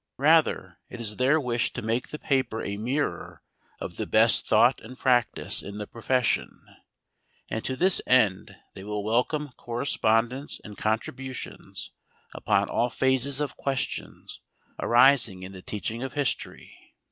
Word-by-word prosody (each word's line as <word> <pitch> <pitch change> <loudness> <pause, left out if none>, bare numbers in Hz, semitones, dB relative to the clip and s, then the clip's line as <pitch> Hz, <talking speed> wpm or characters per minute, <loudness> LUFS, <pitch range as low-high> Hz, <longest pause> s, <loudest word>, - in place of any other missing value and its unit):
Rather 150 - +2
it 120 - -9
is 105 -2 -4
their 135 +5 +3
wish 120 -4 0
to - - -5
make 115 +3 -1
the 150 - -6
paper 130 -6 -1
a 100 - -3
mirror 130 +8 -3 0.4
of - - -7
the - - -3
best - - +4
thought - - +4
and 125 +4 -11
practice 125 -4 +2
in 100 +1 -8
the 105 - -4
profession, 120 +2 -1 0.9
and 110 - -3
to 130 - -2
this 185 +7 +3
end 110 -7 +2 0.2
they 95 - -9
will 105 0 -4
welcome 125 +7 0
correspondence 120 +1 0
and 105 -2 -10
contributions 130 +5 -4 0.4
upon - - +1
all 120 - 0
phases 130 +2 +1
of 150 -1 -3
questions 135 -2 -4 0.4
arising 120 -6 +4
in 95 - -8
the 95 -1 -10
teaching 110 +4 -4
of 135 0 -5
history. 145 -4 -4
120 Hz, 145 wpm, -26 LUFS, 110-135 Hz, 0.9 s, best